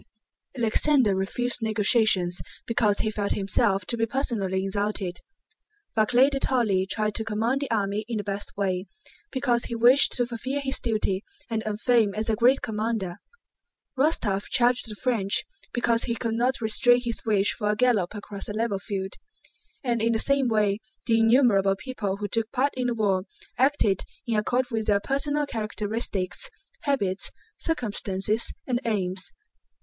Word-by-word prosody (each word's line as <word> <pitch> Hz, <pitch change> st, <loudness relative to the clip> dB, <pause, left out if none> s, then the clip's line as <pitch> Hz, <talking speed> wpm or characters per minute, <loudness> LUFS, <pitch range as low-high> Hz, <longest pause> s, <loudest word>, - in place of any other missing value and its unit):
Alexander 240 Hz, 0 st, +3 dB
refused 245 Hz, +6 st, -1 dB
negotiations 210 Hz, -4 st, +3 dB, 0.2 s
because 215 Hz, -3 st, +2 dB
he 220 Hz, -, -1 dB
felt 205 Hz, -1 st, -1 dB
himself 195 Hz, 0 st, +1 dB
to 235 Hz, -, -1 dB
be 225 Hz, -1 st, 0 dB
personally 205 Hz, -7 st, -1 dB
insulted. 195 Hz, -2 st, -2 dB, 0.8 s
Barclay 245 Hz, +5 st, +4 dB
de 275 Hz, -, -1 dB
Tolly 215 Hz, -9 st, +1 dB
tried 215 Hz, +1 st, -1 dB
to 220 Hz, -, -2 dB
command 225 Hz, +5 st, -1 dB
the 280 Hz, -, -3 dB
army 205 Hz, -2 st, -1 dB
in 230 Hz, -2 st, -3 dB
the 205 Hz, -, -3 dB
best 200 Hz, 0 st, -4 dB
way, 190 Hz, -1 st, -1 dB, 0.4 s
because 250 Hz, -3 st, +1 dB
he 235 Hz, -, -4 dB
wished 245 Hz, +4 st, +5 dB
to 245 Hz, -, +1 dB
fulfill 250 Hz, +4 st, -3 dB
his 270 Hz, -1 st, +1 dB
duty 210 Hz, -4 st, -1 dB, 0.3 s
and 225 Hz, -1 st, -1 dB
earn 210 Hz, -1 st, -2 dB
fame 225 Hz, -3 st, +2 dB
as 220 Hz, +1 st, -1 dB
a -, -, +1 dB
great 250 Hz, +5 st, +3 dB
commander. 215 Hz, -5 st, -2 dB, 0.8 s
Rostóv 230 Hz, -9 st, +1 dB
charged 245 Hz, -1 st, +2 dB
the 210 Hz, -, -6 dB
French 210 Hz, -4 st, +1 dB, 0.3 s
because 235 Hz, -1 st, +1 dB
he 235 Hz, -, -2 dB
could 230 Hz, -1 st, -3 dB
not 245 Hz, +3 st, 0 dB
restrain 245 Hz, +2 st, +4 dB
his 235 Hz, -2 st, -4 dB
wish 205 Hz, -2 st, +2 dB
for 210 Hz, -3 st, -2 dB
a 210 Hz, -, +2 dB
gallop 215 Hz, -5 st, +1 dB
across 205 Hz, -1 st, -7 dB
a -, -, -3 dB
level 215 Hz, -2 st, -1 dB
field; 195 Hz, -2 st, -4 dB, 0.7 s
and 240 Hz, -3 st, 0 dB
in 230 Hz, +1 st, +2 dB
the 225 Hz, -, 0 dB
same 275 Hz, 0 st, +3 dB
way 210 Hz, -3 st, +1 dB, 0.3 s
the 225 Hz, -2 st, +3 dB
innumerable 225 Hz, -5 st, +4 dB
people 205 Hz, -4 st, -4 dB
who 205 Hz, 0 st, -4 dB
took 225 Hz, +2 st, -1 dB
part 275 Hz, +2 st, +1 dB
in 250 Hz, -1 st, -1 dB
the 240 Hz, -, -1 dB
war 195 Hz, -4 st, 0 dB, 0.3 s
acted 260 Hz, -8 st, +2 dB, 0.2 s
in 235 Hz, -3 st, -1 dB
accord 245 Hz, +4 st, +1 dB
with 220 Hz, -1 st, -2 dB
their 205 Hz, -1 st, +3 dB
personal 285 Hz, +5 st, -1 dB
characteristics, 215 Hz, -, 0 dB, 0.4 s
habits, 200 Hz, -10 st, +1 dB, 0.3 s
circumstances, 215 Hz, -, 0 dB
and 245 Hz, -1 st, -1 dB
aims. 190 Hz, -4 st, -1 dB
220 Hz, 160 wpm, -25 LUFS, 200-245 Hz, 0.8 s, wished